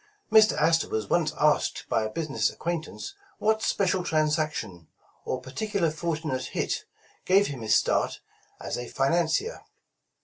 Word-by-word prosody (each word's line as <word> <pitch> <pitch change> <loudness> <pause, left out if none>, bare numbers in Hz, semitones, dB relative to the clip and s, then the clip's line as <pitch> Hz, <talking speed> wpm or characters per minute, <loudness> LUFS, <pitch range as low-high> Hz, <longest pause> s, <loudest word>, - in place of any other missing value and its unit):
Mr. 220 0 +6
Astor 165 +1 +3
was 110 -2 -3
once 160 -3 +2
asked 150 0 +2
by - - +1
a 110 - -2
business 150 +4 -1
acquaintance 170 - -5 0.2
what 220 0 +1
special 190 -4 +1
transaction, 155 - -1 0.4
or 130 - -2
particularly 175 - -2
fortunate 155 -5 -2
hit, - - -2 0.4
gave 195 +2 +4
him 135 -8 -5
his 110 -1 +3
start - - +1 0.4
as - - -4
a 120 - -5
financier. 170 - 0
155 Hz, 135 wpm, -27 LUFS, 135-180 Hz, 0.4 s, Mr